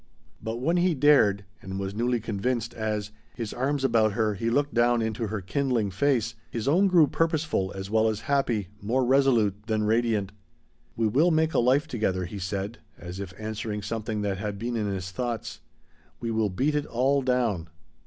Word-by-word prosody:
But 110 +1 -3
when 165 +7 +1
he 175 -1 +2
dared, 130 -9 +4 0.2
and 95 0 -5
was 95 0 -3
newly 120 +3 0
convinced, 115 +2 -2
as, 105 -2 -3 0.2
his 115 -3 -4
arms 135 +2 -1
about 115 -5 +3
her 110 -1 +1
he 110 +4 -2
looked 145 +4 +1
down 120 0 +3
into 110 0 -2
her 105 -1 -3
kindling 115 +1 0
face, 120 +1 +1 0.2
his 115 0 -4
own 180 +8 +4
grew 175 -4 +6
purposeful 155 - 0
as 95 0 -5
well 110 0 +3
as 110 -1 -3
happy, 120 -9 0
more 125 +5 +1
resolute 120 -6 +2
than 110 -2 0
radiant. 110 -2 +1 0.6
"We 115 - 0
will 145 +11 +3
make 160 -1 +2
a - - +3
life 130 +6 +3
together," 95 - -1
he 100 +3 -7
said, 100 +4 -4 0.2
as 90 +2 -8
if 100 -3 -5
answering 110 -1 -4
something 110 0 -3
that 100 -2 -1
had 105 0 -3
been 120 +3 -3
in 105 -2 -1
his 95 -2 -4
thoughts. 120 +2 -4 0.6
"We 115 -1 -3
will 110 -2 +1
beat 130 +11 0
it 150 -1 -1
all 135 +4 +2
down." 120 -10 0
115 Hz, 185 wpm, -27 LUFS, 105-130 Hz, 0.6 s, grew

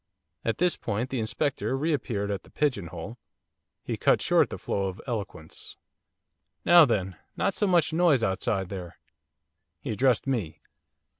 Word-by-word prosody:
At 115 - 0
this 180 0 +2
point 115 +6 -2
the 130 - -1
Inspector 135 +4 -1
re 155 +4 +1
appeared 105 -7 -2
at 100 -3 -2
the - - -19
pigeon 125 - 0
hole. 90 +8 -8 0.6
He - - -3
cut - - +3
short - - +3
the - - -5
flow 100 -1 -1
of 95 0 -6
eloquence. 100 -9 -5 0.9
'Now 175 -2 +9
then, 95 -7 -1 0.2
not 195 - +1
so 205 - 0
much 175 -4 +3
noise 160 -8 +4
outside 95 0 0
there!' 90 -4 -7 0.8
He 105 - -4
addressed 120 +2 +2
me. 100 - -2
115 Hz, 155 wpm, -27 LUFS, 95-145 Hz, 0.9 s, Now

